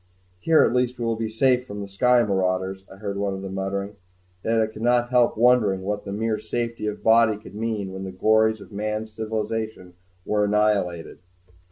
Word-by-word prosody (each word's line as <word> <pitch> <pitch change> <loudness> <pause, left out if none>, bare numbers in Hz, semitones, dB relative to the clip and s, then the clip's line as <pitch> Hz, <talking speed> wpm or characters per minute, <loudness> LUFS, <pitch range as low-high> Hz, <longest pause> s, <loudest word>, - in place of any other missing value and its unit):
"Here 160 - +4
at - - +2
least 125 0 0
we 120 - -3
will 115 0 0
be 110 0 -3
safe 125 +3 +2
from 105 -4 -8
the 100 - -6
sky 120 +5 +3
marauders," 95 -1 -1
I - - -11
heard 100 0 -5
one 100 -1 -1
of 95 - -7
them 95 -1 -6
muttering. 100 +1 -3 0.5
Yet 115 0 +1
I 110 - +3
could 110 0 -10
not 120 0 +2
help 120 -3 +3
wondering 110 -5 +3
what 105 +1 -3
the 100 - -5
mere 110 +1 -1
safety 115 -1 -3
of 105 - -3
the - - -24
body 110 -1 +4
could 105 - -13
mean 105 -3 -3
when 95 - -6
all 95 - -5
the 95 - -12
glories 110 +2 +3
of - - -13
man's 105 +1 -4
civilization 110 -3 -4 0.3
were 105 0 +1
annihilated. 100 -5 0
110 Hz, 210 wpm, -24 LUFS, 100-115 Hz, 0.5 s, Here